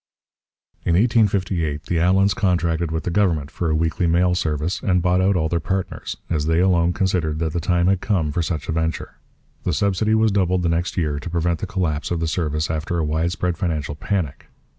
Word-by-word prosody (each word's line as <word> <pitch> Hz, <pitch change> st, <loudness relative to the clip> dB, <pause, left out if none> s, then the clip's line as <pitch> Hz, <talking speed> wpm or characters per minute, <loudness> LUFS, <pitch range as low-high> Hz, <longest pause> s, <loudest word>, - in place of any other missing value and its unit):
In 85 Hz, -, +1 dB
1858 95 Hz, -8 st, +1 dB
the 85 Hz, -, -2 dB
Allans 95 Hz, +3 st, +3 dB
contracted 85 Hz, -4 st, 0 dB
with 80 Hz, 0 st, -3 dB
the 90 Hz, -, -2 dB
government 85 Hz, -7 st, +1 dB
for 85 Hz, -, -2 dB
a 80 Hz, -, +1 dB
weekly 80 Hz, +2 st, 0 dB
mail 90 Hz, +2 st, +3 dB
service 80 Hz, +1 st, -1 dB
and 90 Hz, -2 st, +2 dB
bought 90 Hz, +1 st, +2 dB
out 95 Hz, +1 st, +3 dB
all 80 Hz, -3 st, +1 dB
their 85 Hz, +1 st, 0 dB
partners, 95 Hz, +3 st, -3 dB
as 75 Hz, -2 st, -1 dB
they 80 Hz, +1 st, +2 dB
alone 90 Hz, -2 st, +3 dB
considered 90 Hz, -5 st, 0 dB
that 80 Hz, -1 st, -2 dB
the 85 Hz, -, 0 dB
time 85 Hz, +1 st, +1 dB
had 95 Hz, 0 st, +2 dB
come 85 Hz, -8 st, 0 dB
for 85 Hz, -, -1 dB
such 80 Hz, -3 st, -3 dB
a -, -, -1 dB
venture. 80 Hz, 0 st, -3 dB, 0.4 s
The -, -, 0 dB
subsidy 100 Hz, +2 st, +1 dB
was 110 Hz, -1 st, +3 dB
doubled 95 Hz, -2 st, +1 dB
the 85 Hz, -, +1 dB
next 85 Hz, +3 st, -1 dB
year 75 Hz, -4 st, 0 dB
to 90 Hz, -, -6 dB
prevent 85 Hz, -1 st, 0 dB
the -, -, -4 dB
collapse 80 Hz, -6 st, -2 dB
of 85 Hz, -, -1 dB
the 80 Hz, -, -1 dB
service 80 Hz, -1 st, -1 dB
after 80 Hz, +2 st, -2 dB
a 80 Hz, -, 0 dB
widespread 85 Hz, +3 st, -1 dB
financial 75 Hz, -5 st, -2 dB
panic. 80 Hz, -1 st, -3 dB
85 Hz, 205 wpm, -22 LUFS, 80-90 Hz, 0.4 s, Allans